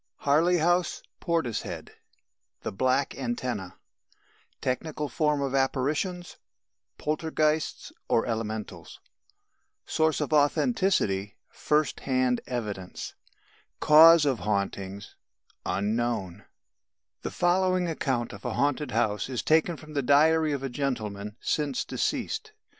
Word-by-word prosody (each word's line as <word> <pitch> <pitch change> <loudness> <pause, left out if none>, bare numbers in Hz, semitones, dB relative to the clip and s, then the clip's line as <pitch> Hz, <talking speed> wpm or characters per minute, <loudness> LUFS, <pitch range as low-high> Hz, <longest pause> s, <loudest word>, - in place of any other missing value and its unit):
HARLEY 160 +5 +3
HOUSE, 175 +1 +1 0.2
PORTISHEAD 160 -10 -2 0.7
THE - - -3
BLACK 130 +6 +1
ANTENNÆ 120 -6 -4 0.8
Technical 150 +4 -2
form 150 +2 +1
of 135 -1 -2
apparitions: 145 +7 -1 0.6
Poltergeists 155 0 -1 0.2
(or 115 - +3
Elementals) 110 -2 -5 0.9
Source 160 -1 +1
of 150 0 -2
authenticity: 145 - +2
First 150 -2 0
hand 130 -2 +1
evidence 105 -7 -5 0.7
Cause 160 +1 +8
of 135 -4 +1
hauntings: 100 -1 -3 0.5
Unknown 105 -1 -1 0.8
The - - -3
following 185 0 +2
account 130 -7 -2
of - - -11
a - - -2
haunted 145 0 0
house 110 -1 0
is 125 -5 -3
taken 160 +1 +2
from 155 0 -12
the 140 - 0
diary 155 +4 +4
of 140 -2 -2
a - - -1
gentleman 105 -7 -3
since 145 -4 -1
deceased. 435 -2 -2
140 Hz, 105 wpm, -27 LUFS, 115-155 Hz, 0.9 s, Cause